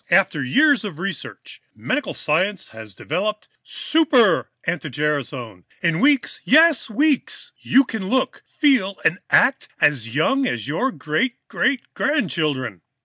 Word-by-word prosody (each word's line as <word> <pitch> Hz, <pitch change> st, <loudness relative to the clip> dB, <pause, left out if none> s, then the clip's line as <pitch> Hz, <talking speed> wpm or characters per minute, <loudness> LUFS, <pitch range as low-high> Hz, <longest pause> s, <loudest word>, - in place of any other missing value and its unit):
"After 175 Hz, -6 st, +2 dB
years 285 Hz, -, +3 dB
of 195 Hz, -8 st, -6 dB
research, 195 Hz, +3 st, -7 dB
medical 295 Hz, -, -3 dB
science 185 Hz, +6 st, -1 dB
has 110 Hz, -3 st, -11 dB
now -, -, -12 dB
developed 210 Hz, +7 st, -3 dB
Super 255 Hz, -, +2 dB, 0.2 s
anti 165 Hz, -2 st, -3 dB
gerasone! 130 Hz, -, -3 dB, 0.2 s
In 165 Hz, -1 st, +1 dB
weeks 280 Hz, +1 st, +2 dB
yes, 315 Hz, -2 st, +4 dB
weeks 285 Hz, +4 st, 0 dB
you 270 Hz, -, +4 dB
can 220 Hz, -6 st, -5 dB
look, 260 Hz, +2 st, -1 dB
feel 250 Hz, -, +1 dB
and 180 Hz, -, +2 dB
act 270 Hz, +1 st, +3 dB
as 125 Hz, -6 st, +2 dB
young 270 Hz, -, +1 dB
as 120 Hz, +1 st, -3 dB
your 245 Hz, -, -1 dB
great 235 Hz, +9 st, -2 dB
great 255 Hz, -1 st, 0 dB
grandchildren! 150 Hz, -, -1 dB
195 Hz, 135 wpm, -21 LUFS, -, 0.2 s, yes